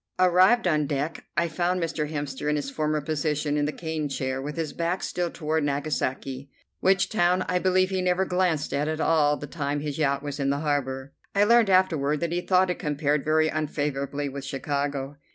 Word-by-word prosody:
Arrived 185 +5 +5
on 150 -3 +2
deck 145 +3 -3
I 170 +1 +3
found 175 +3 0
Mr. 155 -3 -2
Hemster 145 -1 -3
in 150 - +2
his 140 -2 -3
former 155 +1 -1
position 150 0 -1
in 145 -1 +1
the 150 - -1
cane 160 -2 -4
chair, 130 -1 -2
with 145 +2 -5
his 160 -3 -3
back 170 +2 -1
still 175 -1 -1
toward 160 -1 -1
Nagasaki, 140 -2 -2 0.3
which 190 0 +3
town 180 -2 +2
I 180 0 +1
believe 185 +1 +2
he 190 -1 0
never 180 +1 +1
glanced 180 -5 0
at 155 +2 -1
all 150 -3 +3
the - - -6
time 145 -1 -3
his 150 0 -4
yacht 140 -2 +1
was 145 0 -5
in 140 0 +1
harbor. 140 -2 -2 0.2
I 200 - +5
learned 230 0 +5
afterward 160 -6 +3
that 170 -1 -1
he 175 +1 0
thought 185 0 +3
it - - -4
compared 145 -1 0
very 155 +1 +3
unfavorably 145 -2 -2
with 140 0 -6
Chicago. 140 0 -3
150 Hz, 190 wpm, -26 LUFS, 145-175 Hz, 0.3 s, Arrived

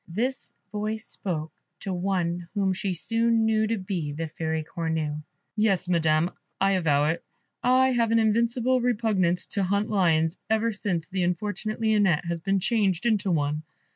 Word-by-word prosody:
This 245 +10 -3 0.2
voice 215 +1 -3
spoke 160 -5 -4 0.3
to 195 - -3
one 175 -2 -1
whom 195 -2 +2
she 185 0 -2
soon 230 +4 +2
knew 220 0 +2
to 225 +1 0
be 185 -6 -3
the 160 +2 -4
Fairy 160 0 -2
Cornue. 160 -2 -3 0.3
"Yes, 205 -4 +2
Madam, 165 -1 +2 0.3
I 195 0 +3
avow 150 -6 +2
it. 165 - -2 0.4
I 260 +1 +4
have 235 -2 +2
an 230 - +3
invincible 235 +3 +2
repugnance 210 -7 +1
to 200 - +1
hunt 200 +3 0
lions 165 -4 +2
ever 220 +1 +2
since 185 -5 -2
the 190 -1 -2
unfortunate 205 +5 -2
Lionette 205 -7 +2
has 170 0 -2
been 195 +3 +1
changed 195 -2 +1
into 210 -4 +2
one. 150 -2 0
195 Hz, 160 wpm, -26 LUFS, 170-220 Hz, 0.4 s, I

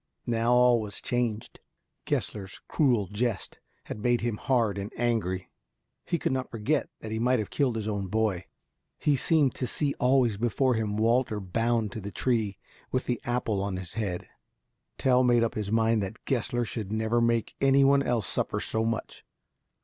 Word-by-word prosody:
Now 115 0 +2
all 125 -1 +5
was 105 -2 -5
changed. 120 -3 -2 0.5
Gessler's 100 -1 -3
cruel 125 -9 +2
jest 105 +1 -3 0.2
had - - -7
made 120 +2 +2
him 115 -2 -1
hard 115 -7 +1
and 100 +2 -5
angry. 110 -7 -1 0.6
He 170 - +1
could - - -1
not 130 -1 -2
forget 115 +7 -1
that 110 - -6
he 110 - -2
might 125 +2 +3
have 110 -3 -3
killed 135 -5 +1
his 110 -1 -3
own 100 -3 -2
boy. 105 -3 0 0.5
He 145 - +2
seemed 145 -1 +3
to 125 - -3
see 145 +1 0
always 125 -4 +3
before 120 +4 +1
him 110 -2 -1
Walter 115 0 +2
bound 115 +3 0
to 110 - -6
the 100 - -5
tree 110 -1 0 0.3
with 130 - 0
the 120 - -2
apple 120 -5 0
on 100 -1 -2
his 90 -2 -6
head. 100 -6 -3 0.7
Tell 130 -1 +3
made 120 -2 +4
up 115 - 0
his 105 -2 -3
mind 115 -1 +3
that 100 +3 -6
Gessler 120 -1 0
should 105 -3 -5
never 110 +2 +1
make 115 -1 +1
any 135 0 +5
one 140 0 +5
else 120 -5 0
suffer - - -1
so 110 0 -1
much. 115 0 -3
115 Hz, 180 wpm, -28 LUFS, 105-125 Hz, 0.7 s, all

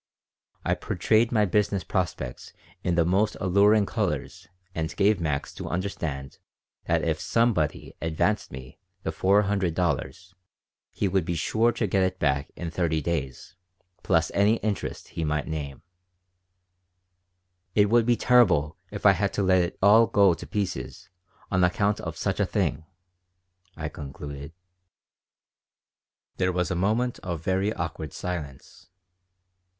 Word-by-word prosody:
I - - +2
portrayed 110 +6 +1
my 105 -2 +3
business 100 0 +1
prospects 75 -9 -3 0.3
in 90 - +1
the 85 -1 +3
most 100 +5 +1
alluring 100 +3 +4
colors - - -3 0.3
and 80 -3 -3
gave 100 -1 +3
Max 75 -4 -2
to - - -6
understand 80 -7 -4 0.5
that - - +1
if 80 -1 0
"somebody" 110 -10 0
advanced 80 -1 0
me 65 0 -10 0.2
the 80 - -2
four 95 +6 +3
hundred 100 -5 0
dollars 85 +1 -2 0.6
he 100 - -1
would 95 -1 +1
be 85 +1 -2
sure 110 +8 +2
to 120 -1 -1
get 95 -1 +1
it 95 0 0
back 70 -3 0
in 85 -2 -5
thirty 80 -2 0
days 70 -5 -4 0.5
plus 85 -3 +1
any 100 +3 +4
interest 105 -2 -3
he 80 - -4
might 75 -1 -1
name 75 -3 -5 1.9
"It 105 -1 +5
would 120 -1 +4
be 120 -1 +3
terrible 90 - +3
if - - -7
I - - +9
had - - 0
to 100 - 0
let 95 -1 +4
it 85 +1 -3
all 110 +3 +7
go 100 -3 +4
to 80 - -8
pieces 100 -3 -4 0.4
on 95 -1 +3
account 100 +4 +2
of - - -6
such - - -1
a - - +3
thing," 80 +2 -1 0.9
I 80 -1 -3
concluded 70 0 -8 1.8
There 95 -1 +1
was 90 +1 -1
a - - 0
moment 110 +7 0
of 85 -4 -5
very 95 +2 +1
awkward 80 -6 -5
silence. 85 0 -7
90 Hz, 145 wpm, -26 LUFS, 80-100 Hz, 1.9 s, I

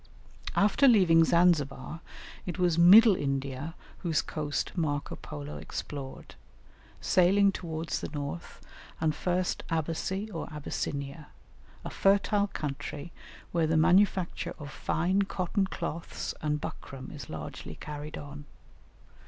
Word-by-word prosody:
After 210 +7 +4
leaving 180 -9 +6
Zanzibar 165 -4 +2 0.5
it 180 - -3
was 175 -3 +2
Middle 200 +5 +9
India 135 +1 -3 0.2
whose 165 -4 0
coast 150 -2 -3
Marco 150 -4 -1
Polo 75 0 -7
explored, 135 - -7 0.7
sailing 195 +2 +4
towards 165 -3 -4
the - - -4
north, 145 +3 -6 0.4
and 160 -1 +2
first 180 +3 -1
Abassy 165 +5 -1
or 165 - -5
Abyssinia, 145 0 -4 0.6
a - - -4
fertile 200 +1 +3
country 150 0 -5 0.4
where 165 -2 +2
the 160 +1 +2
manufacture 180 +2 +3
of 145 -2 -8
fine 185 +8 0
cotton 195 0 -1
cloths 170 -2 -4
and 150 -1 0
buckram 135 -2 -7
is 145 -5 -9
largely 80 -1 -7
carried 150 0 -7
on. 145 0 -9
165 Hz, 115 wpm, -29 LUFS, 145-185 Hz, 0.7 s, Middle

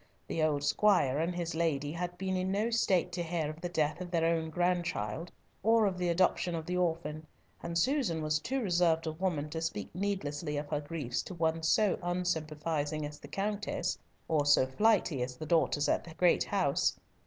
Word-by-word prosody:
The 165 - -2
old 150 -2 +1
squire 145 -5 +3
and 170 +2 -1
his 170 -1 -2
lady 150 -3 0
had 175 +2 -4
been 190 0 -2
in 185 +1 -1
no 215 +4 0
state 185 -6 +2
to 175 0 -3
hear 165 -3 -2
of 155 +2 -12
the 175 - -3
death 155 0 0
of 180 - -5
their 165 -2 +1
own 165 -1 +1
grandchild, 175 - -1 0.3
or 225 +1 +4
of 185 -2 -1
the 180 -1 +1
adoption 175 0 +2
of 160 -1 -4
the 180 +1 -2
orphan 160 -3 -1 0.3
and 170 0 -3
Susan 205 - +1
was 155 0 +1
too 260 +9 -2
reserved 170 -4 +2
a 160 - -1
woman 155 -3 -1
to 160 0 -3
speak 105 -11 -4
needlessly 150 -6 -2
of 145 0 -4
her 150 -1 -1
griefs 145 -5 -3
to 185 - -8
one 165 -1 0
so 190 +5 +3
unsympathising 155 -4 -1
as 150 0 -8
the - - -11
Countess 205 +1 -2 0.3
or 155 -3 +2
so 145 -2 +5
flighty 180 - +2
as 125 0 -3
the 155 - -6
daughters 150 -2 +2
at - - +1
the 165 -2 -11
great 175 0 +3
house. 185 -9 +1
165 Hz, 200 wpm, -31 LUFS, 155-180 Hz, 0.3 s, so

